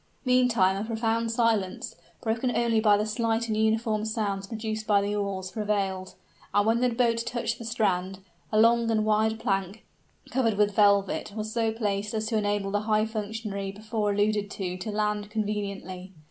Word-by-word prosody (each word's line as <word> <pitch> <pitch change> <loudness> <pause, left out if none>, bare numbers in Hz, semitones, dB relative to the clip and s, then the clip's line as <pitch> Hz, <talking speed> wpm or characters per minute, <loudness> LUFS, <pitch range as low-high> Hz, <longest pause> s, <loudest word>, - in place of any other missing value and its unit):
Meantime 245 -7 +3
a 200 - -2
profound 225 0 -1
silence, 225 -5 0 0.3
broken 230 +2 0
only 230 -2 +2
by 210 -2 +5
the 210 - 0
slight 225 +1 0
and 220 - -1
uniform 220 0 +1
sounds 205 -3 -2
produced 220 -1 -4
by 205 -1 +5
the 200 +1 -1
oars, 195 -2 -3
prevailed: 195 -3 -2 0.4
and 205 0 +4
when 225 +1 +3
the 250 - +3
boat 230 -1 +1
touched 240 -1 -2
the 230 - -7
strand, 195 -4 0 0.3
a 215 - +3
long 230 +1 +4
and 215 -1 +2
wide 220 +1 +2
plank, 195 -2 -2 0.5
covered 230 -5 +1
with 205 -1 +2
velvet, 200 -1 +3
was 215 0 -4
so 225 -1 +1
placed 210 -1 -2
as 220 0 -1
to 220 +1 -1
enable 205 -2 0
the 205 - +1
high 215 0 +3
functionary 210 -2 -4
before 215 +1 -2
alluded 205 0 +1
to 185 -3 -4
to 185 +4 -6
land 210 -1 -1
conveniently. 200 -4 -4
215 Hz, 175 wpm, -27 LUFS, 200-225 Hz, 0.5 s, by